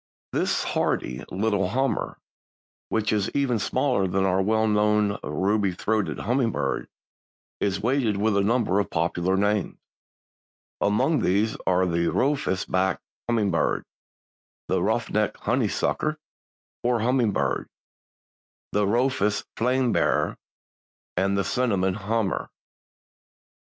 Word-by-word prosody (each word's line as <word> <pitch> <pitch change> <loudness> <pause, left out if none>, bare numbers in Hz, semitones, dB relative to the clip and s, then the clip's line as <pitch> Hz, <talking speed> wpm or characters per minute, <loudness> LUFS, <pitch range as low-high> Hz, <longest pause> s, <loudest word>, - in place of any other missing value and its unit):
_) - - - 0.4
This - - +1
hardy 65 +2 -1
little 100 -1 0
"Hummer," 135 +5 -1 0.7
which 110 -1 0
is 105 -2 +1
even 135 -5 +1
smaller 105 -3 +1
than 95 +1 +1
our 95 0 +2
well 110 +2 +2
known 105 -1 +2
ruby 100 -1 0
throated 110 +3 -1
hummingbird, 120 -2 0 0.7
is 100 0 -1
weighted 120 -4 +1
with 105 +1 +1
a 100 - +3
number 105 -2 +2
of 100 - -1
popular 85 +3 0
names. 105 0 0 1.0
Among 105 +9 +2
these 105 +4 +1
are 95 0 +3
the 85 -1 0
"Rufous 135 - 0
backed 95 0 0 0.3
Hummingbird," 105 -7 +1 0.8
the - - +1
"Ruff - - 0
necked - - 0
Honeysucker, 155 0 0 0.6
or 120 -2 +1
Hummingbird," 110 - +1 1.0
the 105 -1 +1
"Rufous 115 -2 +1
Flame 125 +1 +1
bearer" - - +1 0.8
and 100 +2 +1
the 100 - +1
"Cinnamon 100 -4 +1
Hummer." 105 0 -1
105 Hz, 115 wpm, -25 LUFS, 95-115 Hz, 1.0 s, a